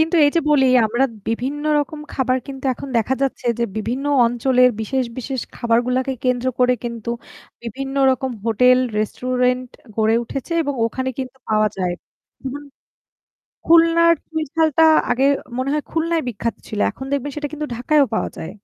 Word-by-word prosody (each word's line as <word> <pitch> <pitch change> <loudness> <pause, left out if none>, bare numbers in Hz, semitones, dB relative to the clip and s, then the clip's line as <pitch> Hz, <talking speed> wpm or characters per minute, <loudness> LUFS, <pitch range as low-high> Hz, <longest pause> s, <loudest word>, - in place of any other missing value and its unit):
কিন্তু 325 +2 +1
এই 290 - +4
যে - - +5
বলি 270 -3 +4 0.2
আমরা 240 +5 +1 0.2
বিভিন্ন 265 +6 -2 0.2
রকম 300 +1 -3
খাবার 260 -1 +1
কিন্তু 270 -1 -8
এখন 275 - -8
দেখা 230 +4 +1
যাচ্ছে 265 -2 -2
যে 235 - +1
বিভিন্ন 235 +6 -3 0.2
অঞ্চলের 250 +1 +3
বিশেষ, 260 +4 -1
বিশেষ, 260 +1 -3
খাবারগুলাকে 250 +3 +1
কেন্দ্র 250 0 +1
করে 250 0 +4
কিন্তু 235 -1 -5 0.5
বিভিন্ন 270 +4 -5 0.2
রকম 260 0 -1
হোটেল 250 +3 +4 0.2
রেস্টুরেন্ট 250 +3 0 0.3
গড়ে 220 0 +3
উঠেছে 275 +7 -6
এবং 285 -2 -2
ওখানে 260 +3 -3
কিন্তু 260 0 -5
পাওয়া 215 0 +3
যায়। 180 -2 -1 0.5
উহুম। 285 +2 -5 1.0
খুলনার 335 0 +5
চুই 320 -1 -2
ঝালটা 320 -1 +3 0.3
আগে 250 +2 +1 0.3
মনে 260 +2 -1
হয় 300 - -1
খুলনায় 330 0 0
বিখ্যাত 230 0 -3
ছিল। 210 - -5
এখন 265 - -9
দেখবেন 280 0 -1
সেটা 300 -1 -3
কিন্তু 300 0 -4
ঢাকায়ও 280 +4 +2
পাওয়া - - -1
যায়। 160 - -6
260 Hz, 160 wpm, -20 LUFS, 240-285 Hz, 1.0 s, যে